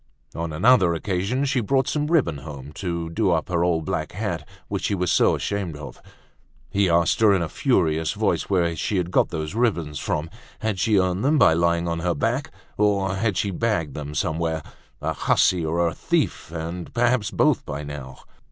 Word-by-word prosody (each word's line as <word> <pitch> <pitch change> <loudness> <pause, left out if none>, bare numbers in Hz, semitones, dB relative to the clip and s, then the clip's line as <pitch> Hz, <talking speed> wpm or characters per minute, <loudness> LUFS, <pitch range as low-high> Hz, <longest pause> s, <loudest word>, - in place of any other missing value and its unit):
On 85 -1 -4
another 95 0 +4
occasion 100 - -1
she 135 -2 +1
brought 130 +4 +1
some 150 +1 0
ribbon 130 - +1
home, 70 -1 -9
to 85 0 -4
do 105 +2 +1
up 85 -1 0
her 85 -1 +1
old 85 -3 +1
black 80 +1 -3
hat 90 -6 -4 0.2
which - - -3
she 100 - +1
was 90 -2 0
so - - +4
ashamed 95 -7 -3
of. 75 - -10 0.7
He 100 -2 +2
asked 85 0 +3
her 105 -3 +5
in 90 - +1
a - - -2
furious 80 - +1
voice - - 0
where 85 -4 +1
she 100 +5 -1
had 90 -1 -1
got - - +3
those 80 0 -4
ribbons 90 -11 0
from. 80 +2 -2 0.3
Had 110 -4 -1
she 105 +2 +3
earned 95 +1 +1
them 150 +3 +3
by 125 - +6
lying 85 +1 +1
on 85 0 -1
her 85 0 0
back - - -1 0.3
or 100 -2 +2
had 105 -2 0
she 100 +1 0
bagged 90 -8 -1
them 75 0 -6
somewhere? 80 +1 -1 0.4
A - - 0
hussy 90 -3 +2
or 85 +2 +1
a 80 - -2
thief, 80 - -1
and 85 +1 -5
perhaps 120 -3 +2
both - - +2
by 75 0 -5
now? 70 -3 -8
85 Hz, 195 wpm, -23 LUFS, 80-105 Hz, 0.7 s, by